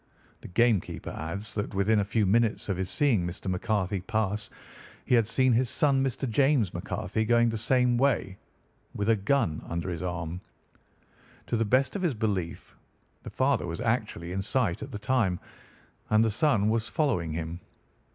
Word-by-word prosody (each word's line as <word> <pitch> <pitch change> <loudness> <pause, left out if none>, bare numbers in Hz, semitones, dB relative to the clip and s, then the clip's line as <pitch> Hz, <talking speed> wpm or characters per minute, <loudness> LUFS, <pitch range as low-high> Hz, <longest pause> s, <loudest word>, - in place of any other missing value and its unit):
The - - -10
game 110 +1 +3
keeper - - -7
adds 100 +7 -5
that 105 0 -3
within 105 +2 +3
a - - +2
few 105 +2 0
minutes 110 +2 +1
of 95 - 0
his 95 -1 -2
seeing 110 -1 +2
Mr. 85 0 -6
McCarthy 95 0 -1
pass 105 +1 -1 0.6
he - - 0
had 115 -3 +4
seen 130 +1 +3
his 120 +1 +2
son, 140 -4 +2
Mr. 135 0 -2
James 130 - +2
McCarthy, 110 - -2
going 120 +1 +3
the 115 - -2
same 125 +1 +2
way 135 -8 +1 0.6
with 105 +2 -1
a 115 - +5
gun 105 - 0
under 85 +2 -3
his 85 - -4
arm. 90 -1 -4 1.0
To - - -2
the 115 0 +1
best 130 - +2
of 200 - -2
his 170 -8 0
belief, 100 -6 -3 0.5
the - - -8
father - - +1
was - - -5
actually 85 +1 -2
in 95 +1 -2
sight 100 -4 0
at - - -7
the - - -4
time, 110 -5 +1 0.7
and 110 +1 +4
the 110 - +1
son 110 -3 +2
was 110 0 0
following 115 - 0
him. 80 +1 -4
110 Hz, 180 wpm, -28 LUFS, 95-120 Hz, 1.0 s, a